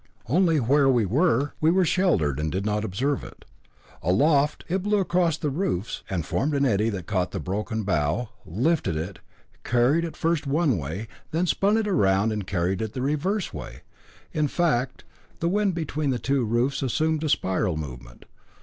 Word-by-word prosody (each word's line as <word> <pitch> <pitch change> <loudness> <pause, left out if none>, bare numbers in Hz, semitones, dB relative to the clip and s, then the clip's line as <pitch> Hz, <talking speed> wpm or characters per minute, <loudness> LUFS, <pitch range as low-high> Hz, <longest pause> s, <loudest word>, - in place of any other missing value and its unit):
Only 165 - +3
where 135 +3 +3
we 120 -5 +3
were 140 - +2
we 155 - +4
were 185 +2 +3
sheltered 95 - +1
and 75 0 -1
did 95 +2 -2
not 105 0 0
observe 130 +8 -1
it. - - -12 0.6
Aloft, 140 - +2
it 185 +2 0
blew 205 +2 +1
across 175 -4 +1
the 150 -3 -2
roofs, 130 - -2
and 85 -5 -2
formed 145 - 0
an 140 0 +2
eddy 110 -2 +2
that 95 -6 -5
caught 90 -3 0
the - - -4
broken 105 +4 -3
bough, 90 +5 0
lifted 105 - 0
it, 90 +4 -5 0.4
carried 125 +7 +2
it 165 - -5
first 165 -3 0
one 140 - +2
way, 80 +10 -5 0.2
then 165 +3 0
spun 200 +4 +2
it 220 - 0
round 100 - +2
and 105 -3 -3
carried 90 +1 -1
it 110 -1 -3
the 130 - -4
reverse 170 +8 -1
way. 75 -5 -8 0.5
In 150 -1 +1
fact, 135 -6 0 0.4
the 170 - 0
wind 200 0 +1
between 155 -3 -2
the 130 - +1
two 135 +2 0
roofs 120 +5 0
assumed 155 +4 0
a 155 - 0
spiral 95 - 0
movement. 60 -5 -8
130 Hz, 180 wpm, -25 LUFS, 95-160 Hz, 0.6 s, we